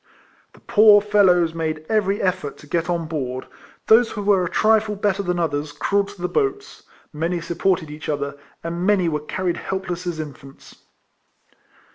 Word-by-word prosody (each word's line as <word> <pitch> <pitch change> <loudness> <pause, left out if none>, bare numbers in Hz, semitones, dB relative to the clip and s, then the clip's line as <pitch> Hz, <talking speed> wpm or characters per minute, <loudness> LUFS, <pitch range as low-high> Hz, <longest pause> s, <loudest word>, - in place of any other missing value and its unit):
The - - -18
poor 210 -1 +6
fellows 190 -5 +3
made 155 -1 -3
every 205 -2 0
effort 185 -6 -1
to - - -15
get 165 +3 -2
on 170 -2 -1
board; 130 -5 -4 0.4
those 225 +1 +5
who 205 - -4
were 200 -2 +3
a 175 - -2
trifle 215 0 +2
better 200 -1 0
than 180 -2 -2
others 150 -3 -1
crawled 200 +5 0
to 185 - -12
the - - +1
boats; 410 - -2 0.3
many 165 +3 -1
supported 170 -1 -1
each 150 0 -8
other; 140 -1 -2 0.3
and 170 +1 -4
many 190 -3 +3
were 150 -2 0
carried 175 +4 -3
helpless 180 -2 -4
as 170 -2 -3
infants. 140 -2 -10
175 Hz, 165 wpm, -22 LUFS, 155-200 Hz, 0.4 s, poor